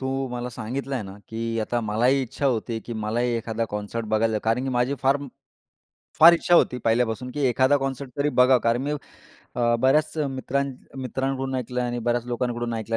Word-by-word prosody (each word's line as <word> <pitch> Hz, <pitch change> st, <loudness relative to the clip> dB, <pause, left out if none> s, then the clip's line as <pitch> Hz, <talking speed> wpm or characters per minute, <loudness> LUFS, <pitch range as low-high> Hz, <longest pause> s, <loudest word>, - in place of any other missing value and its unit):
तू 135 Hz, 0 st, -2 dB
मला 125 Hz, 0 st, -4 dB
सांगितल 130 Hz, +5 st, -5 dB
आहे 125 Hz, -5 st, -1 dB
ना, 95 Hz, 0 st, -9 dB
की 115 Hz, 0 st, -3 dB
आता 120 Hz, +2 st, -1 dB
मलाही 120 Hz, +5 st, +2 dB
इच्छा 135 Hz, +3 st, -3 dB
होती 115 Hz, -2 st, 0 dB
आहे, 110 Hz, -, -3 dB
की 120 Hz, -, -8 dB
मलाही 110 Hz, +3 st, -1 dB
एखादा 115 Hz, 0 st, -2 dB
कॉन्सर्ट 105 Hz, +2 st, -4 dB
बघायचं 110 Hz, +1 st, +1 dB
आहे. 105 Hz, -, 0 dB
कारण 115 Hz, +3 st, +1 dB
की -, -, -2 dB
माझी 125 Hz, +3 st, +1 dB
फार 135 Hz, +1 st, +4 dB, 1.0 s
फार 170 Hz, +2 st, +10 dB
इच्छा 175 Hz, +1 st, +3 dB
होती 125 Hz, -, +3 dB
पहिल्यापासून, 115 Hz, +1 st, +1 dB
की 145 Hz, -, -4 dB
एखादा 130 Hz, +4 st, +3 dB
कॉन्सर्ट 135 Hz, 0 st, -4 dB
तरी 145 Hz, +1 st, +2 dB
बघा. 130 Hz, +1 st, +6 dB
कारण 115 Hz, +2 st, +2 dB
मी 145 Hz, -, -2 dB, 0.6 s
अ, 120 Hz, -1 st, +2 dB
बऱ्याच 150 Hz, +4 st, +2 dB
मित्रां 135 Hz, +1 st, -1 dB, 0.4 s
मित्रांकडून 135 Hz, +1 st, -2 dB
ऐकलं 125 Hz, 0 st, -3 dB
आणि 120 Hz, 0 st, -2 dB
बऱ्याच 120 Hz, 0 st, 0 dB
लोकांकडून 120 Hz, -1 st, -2 dB
ऐकलं 115 Hz, 0 st, -2 dB
125 Hz, 190 wpm, -24 LUFS, 115-135 Hz, 1.0 s, फार